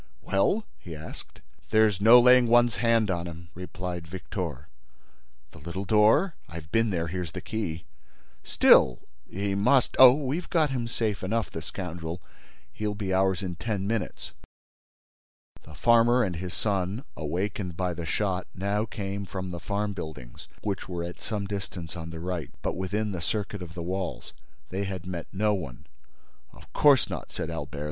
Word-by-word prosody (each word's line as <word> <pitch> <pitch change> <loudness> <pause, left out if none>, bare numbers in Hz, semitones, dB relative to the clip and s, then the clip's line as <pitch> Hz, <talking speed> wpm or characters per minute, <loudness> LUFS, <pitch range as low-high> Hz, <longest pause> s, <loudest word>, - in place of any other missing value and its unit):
"Well?" 195 - +1
he 85 -3 -8
asked. 80 +1 -10 0.3
"There's 110 -3 +3
no 115 +4 +9
laying 125 0 +6
one's 120 -3 +4
hands 115 -1 +3
on 85 -1 -2
him," 85 0 -9
replied 90 -1 -6
Victor. 85 - -5 0.8
"The - - -13
little 85 +6 -5
door?" 110 - +4 0.2
"I've 80 0 -9
been 115 0 +3
there; 85 -4 -1
here's 85 -1 -4
the 90 - -4
key." 90 -4 -4 0.6
"Still—he 65 +11 +3
must—" 125 +6 +3
"Oh, 130 -1 +11
we've 145 +5 -2
got 155 -4 +2
him 120 -3 -2
safe 110 -3 -1
enough, 110 +2 -1
the 80 - -5
scoundrel—He'll 90 +4 -7
be 100 -2 -2
ours 95 0 +2
in 90 -2 -4
ten 100 0 -2
minutes." 110 -2 -3 1.3
The 75 - -14
farmer 120 +6 +5
and 90 -4 -2
his 90 0 -5
son, 100 +3 -1
awakened 90 +3 -3
by 90 -1 0
the 85 0 -5
shot, 95 0 -1
now 100 +3 0
came 100 -2 -4
from 95 -1 -5
the 85 - -5
farm 105 +2 -2
buildings, 75 -10 -8 0.2
which 100 -3 -3
were 85 -2 -3
at 85 +1 -7
some 105 -2 -3
distance 95 -4 -5
on 85 -1 -6
the 80 0 -7
right, 90 -1 -3
but - - -1
within 100 +3 -2
the 90 -3 -4
circuit 105 +2 -3
of 85 -1 -8
the 85 - -4
walls. 90 -6 -4 0.4
They 100 +2 -2
had 95 -2 -5
met 90 -2 -5
no 105 +2 +1
one. 75 -11 -5 0.7
"Of - - -17
course 145 -3 +5
not," - - -6
said 80 - -4
Albert. 75 -3 -5
95 Hz, 165 wpm, -27 LUFS, 85-110 Hz, 1.3 s, Oh